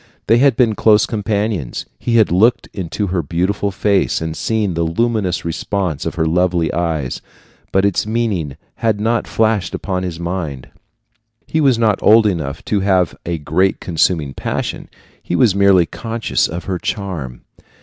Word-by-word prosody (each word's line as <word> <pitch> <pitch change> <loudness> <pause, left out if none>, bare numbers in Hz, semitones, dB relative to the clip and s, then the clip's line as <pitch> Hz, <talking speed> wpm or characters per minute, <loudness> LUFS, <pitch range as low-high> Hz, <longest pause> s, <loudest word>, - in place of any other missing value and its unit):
They 115 +2 +4
had 135 -2 +4
been 115 -3 +3
close 105 0 +4
companions. 105 - -2
He 120 - -1
had 110 -5 +4
looked 110 +7 +3
into 95 +2 -3
her 90 - +1
beautiful 90 +6 -1
face 100 +1 +1
and 80 0 -4
seen 110 -2 -1
the 85 - -1
luminous 95 +2 0
response 85 -2 -2
of - - -4
her 80 -1 0
lovely 85 0 +1
eyes, 80 -6 -2 0.5
but 95 +1 +2
its 100 +1 0
meaning 105 - -1 0.2
had 110 -3 0
not 115 +2 0
flashed 110 -3 0
upon 95 -2 -3
his 90 -3 -5
mind. 85 -7 -4 0.8
He 160 - 0
was 135 -5 +4
not 110 -3 +1
old 110 +1 +6
enough 80 -9 -2
to 105 - 0
have 95 -5 +1
a 85 -1 -1
great 80 +6 0
consuming 80 -4 0
passion, - - -4 0.3
he - - -3
was 110 0 +4
merely 100 -3 +4
conscious 115 +6 -2
of 85 +2 -6
her 90 0 -3
charm. 85 - -4
95 Hz, 160 wpm, -18 LUFS, 85-110 Hz, 0.8 s, old